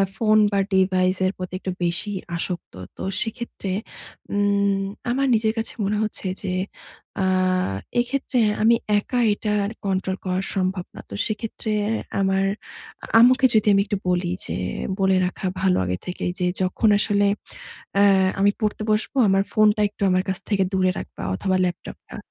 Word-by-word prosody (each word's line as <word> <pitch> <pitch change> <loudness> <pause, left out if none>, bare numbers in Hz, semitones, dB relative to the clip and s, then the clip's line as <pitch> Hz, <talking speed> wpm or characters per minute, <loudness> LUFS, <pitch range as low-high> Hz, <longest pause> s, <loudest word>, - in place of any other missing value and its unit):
Phone 215 -1 +3
বা 200 - +1
device 185 -1 +3
এর 185 - +2
প্রতি 185 0 -6
একটু 190 - -4
বেশিই 190 +4 -1 0.2
আসক্ত। 175 +1 -4 0.2
তো - - -6 0.2
সেক্ষেত্রে 225 -3 -4 0.6
উম 200 -1 +2 0.3
আমার 270 +3 +1
নিজের 220 -1 +2
কাছে 225 - -2
মনে 210 +2 0
হচ্ছে 210 -2 -3
যে, 195 - -3 0.7
আ - - +2 0.8
এক্ষেত্রে 250 +1 0 0.2
আমি 230 +2 +5 0.2
একা 245 +4 -2
এটা 210 +1 -3
আর 200 - -3
কন্ট্রোল 190 -1 0
করা 185 0 0
সম্ভব 185 -1 -1
না। - - -9
তো 100 - -6
সেক্ষেত্রে 215 0 -4 0.5
আমার 195 0 +2 0.6
আ - - -5
আম্মুকে 255 +3 +6
যদি 215 -1 +3
আমি 195 - +4
একটু 205 -1 -2
বলি, 180 0 +1 0.2
যে - - -3 0.4
বলে 190 0 +3
রাখা 180 +2 -4 0.2
ভালো 190 -1 +3
আগে 90 0 -1
থেকেই 180 0 -3
যে, 180 - +1 0.2
যখন 185 +4 +2
আসলে 205 -1 +2 0.7
অ্যা 200 - +5 0.4
আমি 200 +1 +5
পড়তে 215 -1 -1
বসব, 215 +1 0 0.2
আমার 195 0 +3
ফোনটা 215 -1 +4
একটু 205 - -23
আমার 185 0 +2
কাছ 190 - -1
থেকে 200 -3 +2
দূরে 185 -1 +3
রাখবা - - -8
অথবা 190 -1 0
ল্যাপটপটা। 175 -1 -6
200 Hz, 160 wpm, -23 LUFS, 185-215 Hz, 0.8 s, আম্মুকে